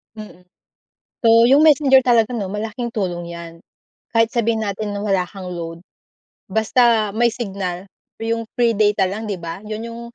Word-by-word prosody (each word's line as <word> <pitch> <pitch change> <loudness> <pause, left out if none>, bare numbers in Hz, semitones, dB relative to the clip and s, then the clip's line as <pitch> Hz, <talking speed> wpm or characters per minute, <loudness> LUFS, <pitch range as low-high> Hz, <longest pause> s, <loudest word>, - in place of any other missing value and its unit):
Mm. 210 -4 -12 0.8
So 230 0 +6
yung 275 +4 +5
Messenger 285 -4 +5
talaga 240 -1 +2
'no 200 -5 -3
malaking 220 +3 -4
tulong 175 -6 -3
iyan. 170 -1 -8 0.6
Kahit 225 0 +1
sabihin 225 -2 0
natin 205 +1 -3
na 205 - -4
wala 195 -3 +1
kang 190 -1 -9
load, 165 -1 -6 0.7
basta 220 +1 +2
may 235 -1 +3
signal, 195 -5 -5 0.3
iyong 230 0 -2
free 235 -3 +1
data 205 -3 +2
lang 215 +4 -5
'di 195 -5 -4
ba? 165 +1 -6
Yun 220 +2 -5
yung, 230 0 -8
215 Hz, 160 wpm, -20 LUFS, 195-230 Hz, 0.8 s, So